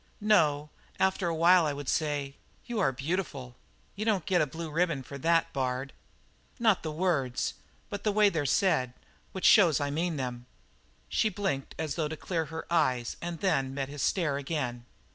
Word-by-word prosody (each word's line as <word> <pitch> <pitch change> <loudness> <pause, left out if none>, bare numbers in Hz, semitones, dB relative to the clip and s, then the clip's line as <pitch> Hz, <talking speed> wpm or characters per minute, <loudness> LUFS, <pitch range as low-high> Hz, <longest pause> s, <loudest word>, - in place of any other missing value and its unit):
"No; 155 -9 +2 0.3
after 190 -1 +1
a 165 - -1
while 170 0 +5
I 145 - -1
would 145 -1 -7
say: 145 -3 -1 0.3
'You 240 -3 -3
are 185 - +3
beautiful.'" 135 -3 -4 0.4
"You 205 - -3
don't 210 -6 +1
get 180 -3 +2
a 150 - +1
blue 160 +2 -6
ribbon 165 -4 0
for 140 +2 -9
that, 165 +3 +2
Bard." 130 0 -2 0.6
"Not 220 -6 +4
for - - -22
the 155 - -4
words, 150 -7 0 0.3
but 205 -1 -6
the 215 - +2
way 210 0 +5
they're 155 -6 -1
said, 130 -6 +2 0.4
which 190 - -4
shows 175 - +6
I 145 -1 -1
mean 165 +3 -1
them." 125 -3 -5 0.6
She 220 - +1
blinked 185 -9 -3
as 160 -2 -2
though 160 -3 -1
to 160 +1 -6
clear 165 -1 -2
her 160 +2 -7
eyes 130 -8 +1
and 170 -1 -5
then 135 -8 +1
met 135 -1 -3
his 145 -1 -6
stare 160 -7 +1
again. 130 -5 -3
155 Hz, 185 wpm, -29 LUFS, 135-180 Hz, 0.6 s, shows